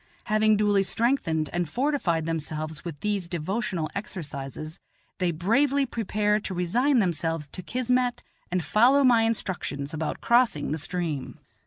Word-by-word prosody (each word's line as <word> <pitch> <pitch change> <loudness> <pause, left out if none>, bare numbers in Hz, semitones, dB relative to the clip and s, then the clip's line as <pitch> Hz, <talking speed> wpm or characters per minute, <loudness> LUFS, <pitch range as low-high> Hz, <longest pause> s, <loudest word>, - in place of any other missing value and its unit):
Having 215 0 +3
duly 205 -1 +3
strengthened 195 - +1
and 175 -2 -1
fortified 240 - 0
themselves 155 -1 -3
with 165 -5 -6
these 205 -4 -1
devotional 175 0 -2
exercises, 155 -5 -6 0.4
they 180 -1 +1
bravely 250 - +2
prepare 210 -3 0
to 195 -3 -5
resign 240 +11 +2
themselves 165 -6 0
to 185 - -4
kismet 250 +4 0 0.3
and 180 -1 0
follow 250 - +5
my 240 -3 +5
instructions 180 -10 -2
about 160 0 -3
crossing 235 - +2
the 155 - -1
stream. 160 -4 -3
185 Hz, 135 wpm, -26 LUFS, 160-230 Hz, 0.4 s, follow